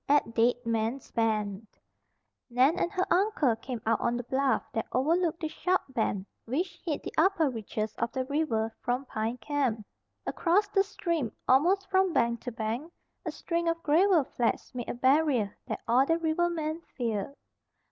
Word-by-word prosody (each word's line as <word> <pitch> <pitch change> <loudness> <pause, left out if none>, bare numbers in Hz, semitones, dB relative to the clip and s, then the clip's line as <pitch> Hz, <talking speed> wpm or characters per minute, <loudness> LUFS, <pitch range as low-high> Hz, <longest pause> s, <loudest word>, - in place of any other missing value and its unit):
AT 285 -5 +3
DEAD 240 +1 +2
MAN'S 230 +3 -1
BEND 215 -2 0 0.8
Nan 260 +8 +3
and 345 - 0
her 370 -2 0
uncle 350 - +2
came 245 +1 -5
out 225 - +2
on 235 0 +1
the 245 - -4
bluff 265 +2 +1
that 225 - -2
overlooked 330 +5 +1
the 315 - 0
sharp 360 +4 0
bend 220 -6 -1 0.2
which 320 +10 -2
hid 315 -5 -2
the - - -6
upper 330 -4 +3
reaches 215 -1 -4
of 235 +1 0
the 260 -1 -2
river 250 -6 0
from 250 +3 -1
Pine 225 0 -2
Camp. 250 -4 -1 0.4
Across 380 +4 +2
the 390 - +3
stream, 335 - -2 0.2
almost 355 +10 +4
from 380 -2 +2
bank 235 -4 +1
to 245 - -5
bank, 230 +8 -3 0.4
a - - 0
string 340 -1 -2
of 335 0 0
gravel 335 +2 +4
flats 245 -1 -2
made 245 -2 -5
a - - -2
barrier 260 -4 +2
that - - -4
all 245 +3 +5
the 330 +4 +2
rivermen 330 -1 0 0.2
feared. 230 0 -2
265 Hz, 165 wpm, -29 LUFS, 230-335 Hz, 0.8 s, all